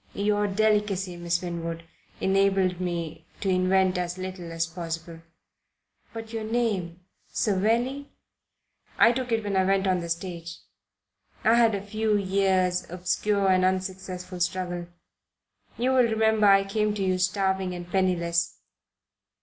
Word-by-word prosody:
Your 205 +1 +1
delicacy, 205 -3 +1
Miss 175 0 -1
Winwood, 170 -1 -4 0.4
enabled 190 -2 +2
me 165 -3 -4
to 195 - -1
invent 185 0 +2
as 175 0 -3
little 185 -2 -6
as 165 0 -1
possible." 165 -1 -6 0.9
"But 225 0 -8
your 225 -1 -3
name 210 -7 -1 0.3
Savelli?" 235 +8 0 0.9
"I 230 - +7
took 250 0 -3
it 225 -1 +1
when 205 -1 -2
I 190 - +4
went 195 +1 +2
on 185 -1 +2
the 170 -1 -6
stage 170 -1 -4 0.9
I 225 - +5
had 230 -2 +4
a 200 0 -5
few 215 0 0
years' 185 -2 +1
obscure 190 +3 0
and 185 0 +4
unsuccessful 185 -1 -2
struggle. 175 -1 -2 0.9
You 250 +3 +1
will 260 - +2
remember 220 -1 +3
I 195 0 +6
came 210 +1 0
to 200 - -2
you 185 -1 +1
starving 190 0 0
and 175 0 -7
penniless." 175 -3 0
190 Hz, 135 wpm, -26 LUFS, 175-205 Hz, 0.9 s, I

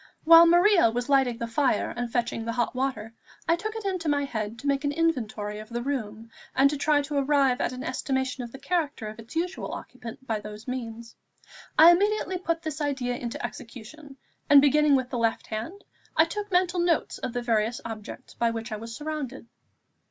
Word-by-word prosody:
While 330 +1 +9
Maria 350 - +5
was 240 +3 -3
lighting 265 -4 +3
the 235 - -3
fire 230 -1 0
and 240 -1 -4
fetching 240 -1 -1
the 230 0 -3
hot 240 -1 -1
water, 250 -4 -3 0.3
I 335 - +4
took 435 +5 -5
it 445 -2 -6
into 365 -5 -1
my 285 -1 +1
head 220 -3 -4
to 280 - -11
make 280 0 +1
an 285 - 0
inventory 225 -10 -1
of 215 +1 -10
the 240 0 -4
room, 225 -5 -4 0.2
and 275 +2 +3
try 295 -1 +3
to 285 0 -1
arrive 275 -2 +2
at - - 0
an 255 +1 -6
estimation 265 0 -2
of 235 - -8
the 270 - -9
character 285 -5 -2
of 215 +1 -11
its 230 +7 -12
usual 350 +3 -2
occupant 250 0 -9
by 220 -4 -1
those 210 +2 -10
means. 235 -2 -6 0.6
I 325 +2 +10
immediately 380 0 +1
put 335 -2 -2
this 315 -1 -4
idea 265 -4 -1
into 240 -1 -4
execution, 270 +5 -10 0.3
and 285 - +9
beginning 290 +1 +4
with 260 -1 -1
the 245 - -2
left 230 -1 0
hand, 230 - -6 0.3
I 320 - +7
took 415 +4 -5
mental 360 0 +2
notes 345 -2 0
of 245 - -4
the 245 - -3
various 225 0 0
objects 220 -2 -8
by 235 - +1
which 230 0 -5
I 215 - -3
was 230 +1 -8
surrounded. 295 -4 -5
265 Hz, 200 wpm, -26 LUFS, 230-310 Hz, 0.6 s, I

